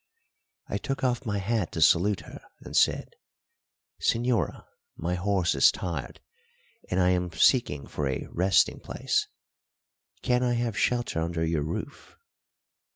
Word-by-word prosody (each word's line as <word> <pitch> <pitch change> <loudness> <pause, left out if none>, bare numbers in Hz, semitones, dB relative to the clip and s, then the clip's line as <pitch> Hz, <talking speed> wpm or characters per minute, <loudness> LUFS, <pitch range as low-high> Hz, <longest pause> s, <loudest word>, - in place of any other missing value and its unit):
I - - -3
took 135 -2 -4
off 125 -1 0
my 105 -1 -1
hat 100 -2 -1
to - - -3
salute 95 +5 +4
her, - - -11 0.2
and - - -9
said: - - +2 0.9
"Señora, 120 +1 0 0.3
my 90 - -3
horse 90 -1 +1
is 70 - +6
tired, 85 -2 -5 0.7
and 90 - 0
I 90 0 +4
am 90 -1 0
seeking 80 - +3
for 75 - -3
a 65 - -3
resting 95 +3 +2
place; 420 0 -1 1.0
can 125 -1 +2
I 125 -1 +1
have 120 -2 -1
shelter 120 -4 0
under 80 0 -1
your 80 -2 0
roof?" 80 +3 -6
95 Hz, 140 wpm, -27 LUFS, 85-120 Hz, 1.0 s, is